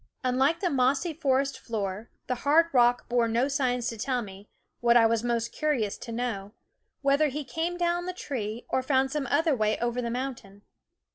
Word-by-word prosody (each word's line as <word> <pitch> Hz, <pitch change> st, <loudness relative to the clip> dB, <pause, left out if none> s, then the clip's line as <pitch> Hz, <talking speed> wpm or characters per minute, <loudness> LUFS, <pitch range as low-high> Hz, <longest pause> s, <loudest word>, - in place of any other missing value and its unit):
Unlike 265 Hz, +6 st, +2 dB
the 360 Hz, -, +1 dB
mossy 270 Hz, +5 st, +1 dB
forest 275 Hz, -2 st, 0 dB
floor, 210 Hz, -1 st, -4 dB, 0.2 s
the 255 Hz, -, -1 dB
hard 325 Hz, +4 st, +4 dB
rock 245 Hz, -1 st, +3 dB
bore 240 Hz, -1 st, +2 dB
no 235 Hz, +4 st, +1 dB
signs 255 Hz, -4 st, 0 dB
to 230 Hz, -, -7 dB
tell 250 Hz, +1 st, -1 dB
me 200 Hz, 0 st, -12 dB, 0.3 s
what 240 Hz, 0 st, +5 dB
I 230 Hz, -, +6 dB
was 225 Hz, 0 st, +2 dB
most 235 Hz, -1 st, -1 dB
curious 270 Hz, -10 st, -1 dB
to 235 Hz, -, -8 dB
know 225 Hz, -4 st, -3 dB, 0.5 s
whether 280 Hz, +2 st, +3 dB
he 295 Hz, +2 st, -4 dB
came 325 Hz, +7 st, -3 dB
down 350 Hz, 0 st, 0 dB
the -, -, -1 dB
tree 235 Hz, -, -5 dB
or 260 Hz, -, 0 dB
found 265 Hz, 0 st, +1 dB
some 290 Hz, -3 st, -2 dB
other 305 Hz, +2 st, +2 dB
way 215 Hz, -2 st, +1 dB
over 240 Hz, +1 st, -1 dB
the 235 Hz, -, -3 dB
mountain. 235 Hz, -5 st, -5 dB
250 Hz, 190 wpm, -27 LUFS, 230-285 Hz, 0.5 s, I